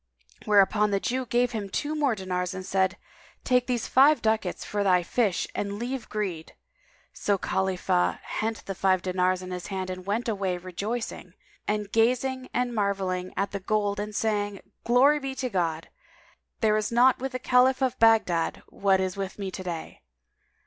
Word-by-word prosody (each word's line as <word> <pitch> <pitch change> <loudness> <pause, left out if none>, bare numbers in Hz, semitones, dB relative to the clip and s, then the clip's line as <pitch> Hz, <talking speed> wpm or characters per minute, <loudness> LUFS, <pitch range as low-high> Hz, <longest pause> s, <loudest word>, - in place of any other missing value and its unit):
Whereupon 210 +1 +4
the 200 -1 +1
Jew 255 +4 -2
gave 245 +1 +2
him 210 -4 -4
two 295 +9 -2
more 290 -6 +1
dinars 180 -2 -3
and 185 0 -6
said, 190 0 +1 0.5
"Take 250 -1 +2
these 245 -3 -1
five 285 +4 +5
ducats 220 -5 -1
for 205 -1 -1
thy 180 -2 +3
fish 200 0 0
and 200 0 -3
leave 245 +2 -4
greed." 190 -7 -4 0.6
So 200 -1 0
Khalifah 185 -1 0
hent 220 0 -3
the 195 - -3
five 185 -1 +1
dinars 185 0 0
in 185 - -7
hand 185 +1 -4
and 185 0 -6
went 210 +5 -2
away, 195 -5 -1
rejoicing, 200 +6 -5 0.3
and 210 -1 -1
gazing 255 +3 +1
and 250 -1 -1
marvelling 195 -3 -1
at 195 0 0
the 200 - -3
gold 205 +1 0
and 210 0 -4
saying, 205 -2 -1 0.2
"Glory 270 +5 +5
be 270 -1 -5
to 255 -2 -3
God! 165 -4 -1 0.7
There 215 -1 +3
is 215 +1 -1
not 245 +2 +5
with 265 +1 -4
the - - -1
Caliph 255 +1 +3
of 260 - 0
Baghdad 215 -8 +3
what 195 -1 +2
is 185 0 -1
with 195 -1 -5
me 195 -2 -4
this 185 - -6
day!" 170 -3 -6
205 Hz, 170 wpm, -27 LUFS, 185-240 Hz, 0.7 s, five